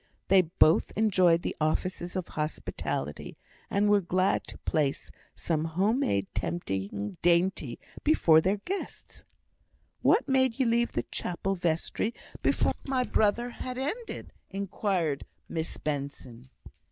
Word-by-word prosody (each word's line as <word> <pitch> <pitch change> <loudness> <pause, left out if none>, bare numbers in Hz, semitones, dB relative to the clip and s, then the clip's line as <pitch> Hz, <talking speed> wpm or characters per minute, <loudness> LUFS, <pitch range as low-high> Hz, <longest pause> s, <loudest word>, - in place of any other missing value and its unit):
They 190 0 +7
both 165 -2 +3
enjoyed 185 -6 +4
the - - -2
offices 175 +3 -1
of 185 -2 -3
hospitality; 150 - -4 0.3
and 205 +1 +2
were 205 -1 +5
glad 185 +2 +1
to - - -8
place 145 -3 -1 0.2
some 155 -2 -1
home 195 +9 +1
made 100 - +1
tempting 100 - -3
dainty 170 -7 +2 0.3
before 165 - +5
their 190 +5 +1
guests. 380 - -6 0.8
"What - - +4
made 260 -3 +2
ye 260 - +3
leave 235 0 +2
the - - 0
chapel 185 +2 -2
vestry 175 +6 -1 0.3
before - - +2
my 260 -2 +1
brother 235 +1 +1
had 250 +1 -6
ended?" 410 - -4 0.2
inquired 190 -6 -1 0.2
Miss 160 0 -3
Benson. 135 -4 -5
180 Hz, 125 wpm, -29 LUFS, 155-215 Hz, 0.8 s, They